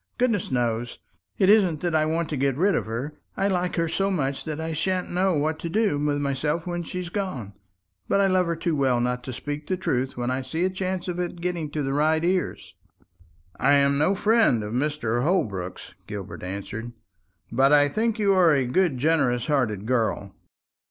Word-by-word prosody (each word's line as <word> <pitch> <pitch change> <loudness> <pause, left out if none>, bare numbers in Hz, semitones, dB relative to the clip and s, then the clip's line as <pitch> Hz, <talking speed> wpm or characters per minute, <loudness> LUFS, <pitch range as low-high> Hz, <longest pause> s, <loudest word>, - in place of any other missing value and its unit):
Goodness 230 -6 +1
knows, 120 -2 -1 0.4
it 190 - +3
isn't 190 -7 +4
that 175 -2 -1
I 155 -1 +3
want 165 +1 0
to 150 - -2
get 135 -1 0
rid 195 +5 +3
of - - -1
her. 125 +7 -4 0.2
I 195 - +2
like 180 -2 0
her 165 -1 +1
so 195 +4 0
much 140 -7 -2
that 155 -1 -4
I 160 0 -3
sha'n't 180 +4 -1
know 185 0 +2
what 155 +2 0
to 170 - -4
do 205 -5 +1
with 145 0 0
myself 145 +3 -1
when 175 -1 -3
she's 180 +1 -5
gone. 170 - -4 0.5
But 200 - +2
I 200 - +4
love 185 -2 +2
her 170 - 0
too 170 -1 -1
well 130 -4 +2
not 125 0 -1
to 130 - -4
speak 145 +4 -5
the 185 - -1
truth 130 -7 -1
when 120 +1 -1
I 130 +1 -1
see 160 +7 -2
a 185 - 0
chance 185 -1 -3
of 180 -1 -3
its 175 -1 -2
getting 170 -3 -3
to 150 0 -3
the 135 0 -1
right 155 +3 +2
ears." 185 0 -1 0.9
"I 140 +2 +4
am 140 0 +3
no 185 +7 +3
friend 210 - +3
of 105 +1 -5
Mr. 125 -3 0
Holbrook's," 110 - -2
Gilbert 100 -3 -7
answered; 100 +5 -6 0.6
"but 135 +4 +4
I 145 -1 +6
think 220 - 0
you 200 -2 +3
are 175 -5 +5
a 135 -2 +1
good 150 +2 +1
generous 125 -4 +1
hearted 115 -9 0
girl." 110 -5 0
155 Hz, 205 wpm, -25 LUFS, 130-180 Hz, 0.9 s, I